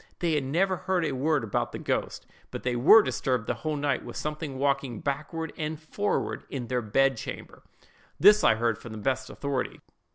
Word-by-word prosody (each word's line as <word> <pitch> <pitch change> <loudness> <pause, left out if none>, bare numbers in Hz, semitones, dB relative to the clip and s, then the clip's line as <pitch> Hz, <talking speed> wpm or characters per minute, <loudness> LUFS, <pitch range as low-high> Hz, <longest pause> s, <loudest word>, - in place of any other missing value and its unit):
They 170 -2 0
had 150 -2 +1
never 185 +7 +1
heard 185 -2 0
a - - -1
word 140 +1 +1
about 105 - -2
the - - -4
ghost; - - -2 0.2
but - - -7
they 125 -1 0
were 165 - +7
disturbed 125 -5 -1
the - - 0
whole 155 -1 -3
night 140 -3 -1
with 120 - -9
something 150 -2 -4
walking 140 -4 0
backward 155 +4 -3
and 155 0 -3
forward 200 +6 -2
in 130 -3 -4
their 125 -1 0
bed 135 +4 +2
chamber. - - -8 0.6
This 210 +2 +7
I - - +5
had 115 0 0
from 115 - -9
the - - -7
best 130 +4 -1
authority. 140 -2 -3
140 Hz, 195 wpm, -27 LUFS, 125-160 Hz, 0.6 s, were